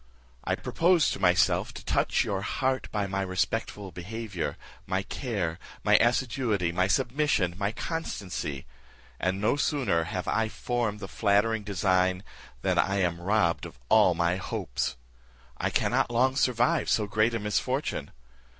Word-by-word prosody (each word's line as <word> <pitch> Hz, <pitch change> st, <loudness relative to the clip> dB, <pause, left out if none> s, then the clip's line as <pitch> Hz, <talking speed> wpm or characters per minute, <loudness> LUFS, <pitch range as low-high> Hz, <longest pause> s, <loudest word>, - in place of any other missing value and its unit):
I -, -, 0 dB
proposed 170 Hz, -1 st, +2 dB
to -, -, -6 dB
myself 90 Hz, -1 st, +2 dB
to -, -, -9 dB
touch -, -, +2 dB
your 95 Hz, -1 st, -2 dB
heart 130 Hz, +5 st, -1 dB
by 105 Hz, -2 st, -1 dB
my 95 Hz, 0 st, -2 dB
respectful 95 Hz, +1 st, -2 dB
behaviour, 100 Hz, +1 st, -5 dB, 0.3 s
my 95 Hz, 0 st, 0 dB
care, 95 Hz, -, -3 dB, 0.2 s
my -, -, +5 dB
assiduity, 120 Hz, -6 st, +1 dB
my 90 Hz, +2 st, +1 dB
submission, 125 Hz, -, +1 dB
my 100 Hz, +2 st, -1 dB
constancy; 100 Hz, -, -4 dB, 0.5 s
and 95 Hz, +1 st, 0 dB
no 110 Hz, +7 st, +2 dB
sooner 130 Hz, -, +1 dB
have 90 Hz, +1 st, -4 dB
I 110 Hz, -1 st, +1 dB
formed 115 Hz, -3 st, -2 dB
the 95 Hz, -, -5 dB
flattering 105 Hz, +2 st, +2 dB
design, 95 Hz, -2 st, +1 dB, 0.4 s
than -, -, +2 dB
I 100 Hz, -, +2 dB
am 85 Hz, -2 st, 0 dB
robbed 90 Hz, -3 st, +1 dB
of -, -, -15 dB
all 105 Hz, -5 st, +5 dB
my 85 Hz, +2 st, +1 dB
hopes. 60 Hz, -9 st, -3 dB, 0.6 s
I -, -, 0 dB
cannot -, -, +1 dB
long 130 Hz, +3 st, +2 dB
survive 125 Hz, -2 st, +2 dB
so 105 Hz, -, +2 dB
great 110 Hz, +3 st, +1 dB
a -, -, -1 dB
misfortune. 105 Hz, -, -1 dB
100 Hz, 145 wpm, -28 LUFS, 90-120 Hz, 0.6 s, my